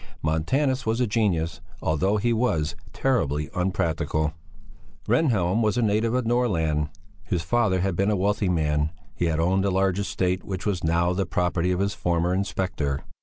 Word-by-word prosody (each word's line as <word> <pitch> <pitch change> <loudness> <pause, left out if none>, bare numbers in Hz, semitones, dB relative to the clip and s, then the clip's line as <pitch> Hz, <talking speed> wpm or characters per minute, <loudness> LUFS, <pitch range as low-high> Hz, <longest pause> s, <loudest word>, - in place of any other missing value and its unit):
Montanus 130 - +1
was 110 0 0
a 125 - +3
genius, 90 -9 0 0.2
although 85 +8 +1
he 120 +3 +1
was 85 -10 0 0.2
terribly 75 - 0
unpractical. 80 -4 0 0.7
Rehnhjelm 110 - +2
was 110 +1 +1
a 120 - +2
native 110 +2 +1
of 125 -2 0
Norrland. 80 -11 +1 0.3
His 90 -4 -2
father 95 0 +2
had 95 -1 0
been 100 +4 +1
a 105 - +2
wealthy 100 +1 +1
man; 75 -3 +1 0.2
he 90 - -1
had 80 -1 0
owned 95 +3 +2
a 100 - +2
large 95 0 +1
estate 95 -2 -1
which 95 -2 -5
was 100 -4 -1
now 85 +2 +2
the 95 -1 -1
property 90 0 0
of 90 +1 0
his 100 0 0
former 85 0 0
inspector. 90 -7 -1
95 Hz, 170 wpm, -25 LUFS, 80-105 Hz, 0.7 s, a